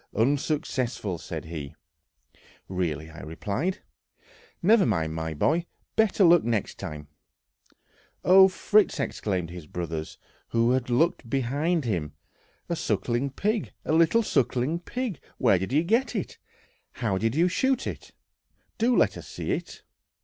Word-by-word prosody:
"Unsuccessful!" 130 - 0
said - - -6
he. 75 -4 -7 0.9
"Really!" 80 -4 -3
I 80 - -11
replied; 110 - -3 0.8
"never 210 +4 +5
mind, 80 -9 0
my 80 -1 -3
boy, 165 - +1 0.3
better 220 -2 +3
luck 175 0 +6
next 115 -4 -2
time." 75 -1 -6 1.2
"Oh, 190 +1 +8
Fritz!" 205 +2 +2
exclaimed 90 -5 -2
his 85 -3 -9
brothers, 80 -2 -5 0.3
who 115 +1 +2
had 125 -1 0
looked 130 0 +1
behind 140 +5 0
him, 85 -10 -2 0.5
"a - - -1
sucking 125 +3 -1
pig, 210 +6 -1
a - - 0
little 165 +8 +4
sucking 135 - +1
pig. 240 - -4 0.2
Where 110 -7 +4
did 95 +5 -4
you 150 +4 +3
get 230 +8 +1
it? 200 - -4 0.5
How 105 -6 -1
did 115 +4 0
you 170 +3 +4
shoot 260 +8 +1
it? - - -6 0.7
Do 240 +2 +3
let - - +3
us - - -10
see - - -4
it!".... - - -4
125 Hz, 135 wpm, -26 LUFS, -, 1.2 s, Oh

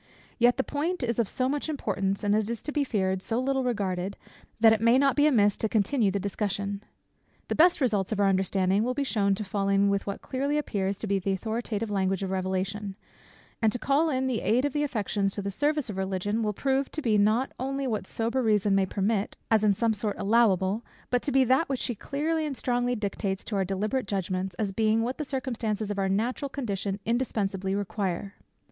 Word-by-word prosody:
Yet 240 +1 +4
the 265 - +1
point 305 +4 -2
is 235 -1 -1
of 225 - +1
so 255 - 0
much 290 +3 -2
importance, 200 -9 -1
and 205 0 +2
it 215 0 +1
is 235 -1 -4
to 300 - -4
be 295 -1 +1
feared, 190 -7 0
so 225 +3 -2
little 265 +1 0
regarded, 195 -5 -2 0.4
that 225 0 +7
it 220 - 0
may 230 +2 +5
not 275 0 +3
be 295 0 +4
amiss 205 -8 +3
to 220 - -1
continue 215 +1 +2
the 200 +1 -1
discussion. 200 0 -2 0.7
The - - +1
best 345 +3 +5
results 215 -8 +1
of 215 - -1
our 200 - +4
understanding 190 0 +2
will 250 +2 -1
be 285 - 0
shewn 200 -7 +1
to 215 - -4
fall 200 0 -1
in 200 0 +3
with 200 0 -1
what 200 - -4
clearly 280 +3 -1
appears 200 -9 -1
to - - -5
be 200 -1 +1
the 195 +1 -1
authoritative 220 +1 -3
language 195 -1 0
of 190 - -3
revelation; 190 +2 -2 0.7
and 220 -1 +4
to 245 - -2
call 280 +6 +2
in 260 -2 0
the 255 -3 -1
aid 245 +5 +2
of 290 - -1
the 295 - 0
affections 210 -7 -1
to 200 - -3
the 200 - -2
service 295 +5 0
of 205 -3 -6
Religion, 190 +3 -1
will 215 -1 0
prove 270 +4 0
to 310 - -3
be 215 -3 +3
not 220 +6 +2
only 275 +2 -2
what 215 -6 -2
sober 235 +3 -1
reason 210 -3 +2
may 195 -1 +3
permit, 200 +2 -1
as 220 -1 +4
in 205 -2 +4
some 230 +2 +1
sort 210 0 -2
allowable; 205 -1 +2 0.3
but 245 -1 +2
to 285 - -2
be 265 0 +5
that 260 +6 +2
which 270 -2 -1
she 245 - -2
clearly 310 +8 -2
and 275 -3 -5
strongly 245 0 0
dictates 200 -2 -3
to 215 - -4
our 195 - +2
deliberate 205 +6 -1
judgments, 190 -1 -2
as 205 -1 -1
being 220 +2 +2
what 250 +5 -3
the - - -1
circumstances 230 -6 -2
of 200 - -3
our 195 0 +1
natural 235 +8 -1
condition 200 -7 -3
indispensably 200 -5 -1
require. 200 -1 -3
215 Hz, 220 wpm, -27 LUFS, 195-255 Hz, 0.7 s, that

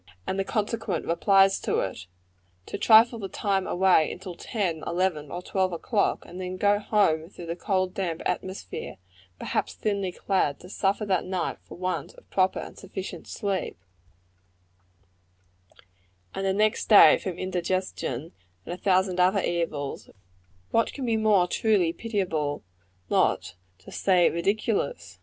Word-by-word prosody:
and 190 - -2
the - - +2
consequent 210 -3 -2
replies 195 +3 +4
to - - -1
it; 90 -2 -5 0.6
to - - -6
trifle 230 +1 +6
the 195 -2 -5
time 195 -1 -1
away 180 -4 +3
till 190 -1 -7
ten, 175 -4 -3
eleven 170 -5 -1
or 175 +1 -6
twelve 190 -1 0
o'clock, 200 +5 0
and 180 +1 -8
then 185 0 -4
go 205 +1 +3
home 170 -7 +1
through 175 - -10
the 170 0 -4
cold, 185 -1 -1
damp 175 -4 -2
atmosphere, 185 - -4 0.4
perhaps - - -2
thinly 200 -3 -1
clad, 180 -6 0
to 180 - -12
suffer 200 +2 0
that 190 -4 +1
night 185 -1 -3
for - - -11
want 185 - -3
of - - -18
proper 185 -1 +2
and - - -7
sufficient 190 -2 -7
sleep, 195 - -3 2.6
and 195 0 -2
the - - +3
next 215 +2 +1
day 210 - +8
from 180 -3 -5
indigestion, 180 -6 -3 0.3
and - - -5
a - - -6
thousand 185 -1 +1
other 185 +2 +3
evils; 160 -5 -3 0.6
what 230 - +2
can 270 - -4
be 230 -2 +1
more 215 -4 +4
truly 185 -4 +2
pitiable, 180 -11 -2 0.5
not - - +1 0.2
to 90 - -14
say 180 -3 +3
ridiculous! 210 - -1
190 Hz, 145 wpm, -26 LUFS, 175-205 Hz, 2.6 s, day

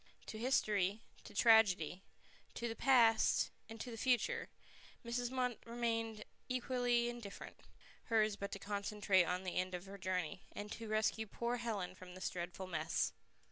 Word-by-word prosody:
To 215 - -6
history, 215 -5 +1 0.2
to - - -11
tragedy, 200 -7 +5 0.5
to 235 - -2
the 225 - -4
past, 235 -4 +4 0.2
to 225 +2 -6
the 225 - -6
future, 370 - +1 0.6
Mrs. 240 +1 -1
Munt 250 -2 0
remained 230 -2 -2 0.2
equally 245 -1 +1
indifferent; 240 -4 -7 0.5
hers 215 -3 +3
but 200 0 -5
to - - -3
concentrate 200 -2 +1
on 180 +2 -1
the 185 - -3
end 185 0 0
of 180 +1 -6
her 195 +1 -9
journey, 185 0 -2
and 205 0 -6
to 230 - -6
rescue 215 +1 +1
poor 235 +4 -2
Helen 220 -7 -3
from 185 -1 -11
this 185 - -3
dreadful 175 +1 -5
mess. 165 -2 0
215 Hz, 150 wpm, -37 LUFS, 190-235 Hz, 0.6 s, tragedy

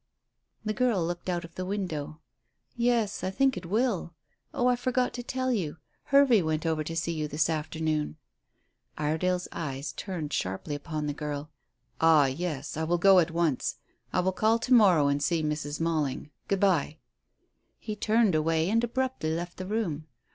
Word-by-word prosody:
The 215 - 0
girl 220 -7 +1
looked 175 +2 -4
out 175 -1 -1
of 170 - -14
the 185 - -4
window. 175 -6 -4 0.5
"Yes, 235 -4 +1
I 185 - 0
think 270 +7 +2
it 180 -2 -6
will. 205 -5 0 0.4
Oh, 245 - -1
I 250 0 +4
forgot 250 0 0
to 245 - -4
tell 255 +1 -2
you. 170 -9 -2 0.3
Hervey 275 -6 +5
went 155 0 -1
over 160 -1 0
to 165 +2 -5
see 165 0 -1
you 155 -2 -2
this 155 +2 +1
afternoon." 155 -1 -2 0.8
Iredale's 180 +4 0
eyes 140 -4 -4
turned 165 -7 -5
sharply 95 - -2
upon 150 +1 -4
the 145 - -1
girl. 150 0 -5 0.5
"Ah, 160 -3 +6
yes, 145 0 -3
I 160 - -1
will 170 +2 +1
go 190 +1 +6
at 170 - +2
once. 165 -5 0 0.4
I 180 - +2
will 190 +1 +1
call 220 +4 +2
to 250 +3 0
morrow 185 -11 +6
and 140 0 +1
see 165 +1 +1
Mrs. 150 -1 -2
Malling. 155 -3 -1 0.2
Good 195 -2 0
bye." 170 -6 +2 0.8
He 215 - -5
turned 215 -1 +2
away 160 +3 +1
and 230 +1 +2
abruptly 255 -7 -1
left 175 +1 -5
the 185 - -5
room. 175 -8 -2
170 Hz, 175 wpm, -28 LUFS, 155-210 Hz, 0.8 s, Ah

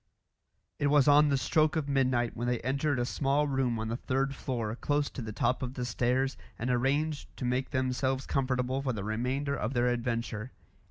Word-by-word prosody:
It 145 - +2
was 145 -1 +4
on 145 +1 +6
the 140 - +3
stroke 155 +3 +2
of 155 -3 -1
midnight 130 -4 +1
when 120 +1 -3
they 120 -1 +1
entered 140 +2 0
a 120 - 0
small 140 +3 +1
room 130 -4 0
on 110 0 -3
the 115 - -2
third 135 +2 -1
floor, 115 -5 -3
close 145 +3 0
to - - -6
the 110 -2 -5
top 120 +4 0
of 130 0 -4
the 125 - -2
stairs, 125 +3 0 0.2
and 125 +2 -1
arranged 140 +5 0
to 125 - -4
make 125 +2 0
themselves 130 0 0
comfortable 130 0 0
for 135 -2 -1
the 105 -4 -4
remainder 125 +6 -1
of 125 +1 -3
their 120 0 +3
adventure. 115 -1 -2
130 Hz, 200 wpm, -30 LUFS, 120-140 Hz, 0.2 s, on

